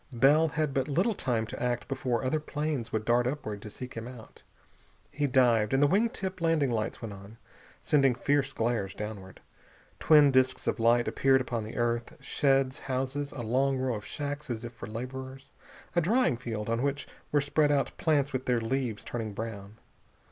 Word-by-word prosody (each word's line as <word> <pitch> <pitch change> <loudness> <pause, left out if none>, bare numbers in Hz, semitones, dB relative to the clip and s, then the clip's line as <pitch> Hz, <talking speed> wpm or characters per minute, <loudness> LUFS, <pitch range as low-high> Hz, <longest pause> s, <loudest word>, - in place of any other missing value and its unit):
Bell 140 +6 +4
had 155 -1 -1
but 135 -1 0
little 180 +10 +1
time 120 - -1
to 110 - -8
act 120 -1 -1
before 130 -2 -1
other 130 +4 +1
planes 150 -5 -3
would 110 0 -2
dart 120 +1 +3
upward 110 -7 -4
to 105 - -8
seek 125 +4 -8
him 115 +1 -6
out. 125 -3 -12 0.7
He 145 +1 0
dived, 120 -4 +3
and 135 - +4
the - - +7
wing 205 +10 +3
tip 190 -4 -5
landing 160 -5 +2
lights 110 +1 -2
went 110 -3 -5
on, 100 +3 -12 0.5
sending 135 -4 +3
fierce 140 +2 +1
glares 110 -6 -1
downward. 105 -3 -7 0.6
Twin 150 -3 +6
disks 130 0 +2
of - - -1
light 120 +1 +3
appeared 135 -1 +3
upon 120 -3 -3
the 110 - -8
earth. 120 0 -1
Sheds, 135 -1 +1
houses, 135 +2 -3
a 130 - -6
long 130 +4 +1
row 130 -1 0
of 105 -2 -5
shacks 145 +3 -5
as 115 -1 -4
if 120 - -7
for - - -8
laborers. 130 +4 -7 0.4
A 175 - +4
drying 225 - +2
field, 115 -3 -5
on 115 +1 0
which 140 +1 -1 0.2
were 150 - +4
spread 145 +1 +2
out 140 -2 0
plants 145 -3 +1
with 130 0 -3
their 125 -2 +2
leaves 115 -2 -2
turning 110 -3 -4
brown. 105 -1 -7
130 Hz, 190 wpm, -29 LUFS, 115-140 Hz, 0.7 s, the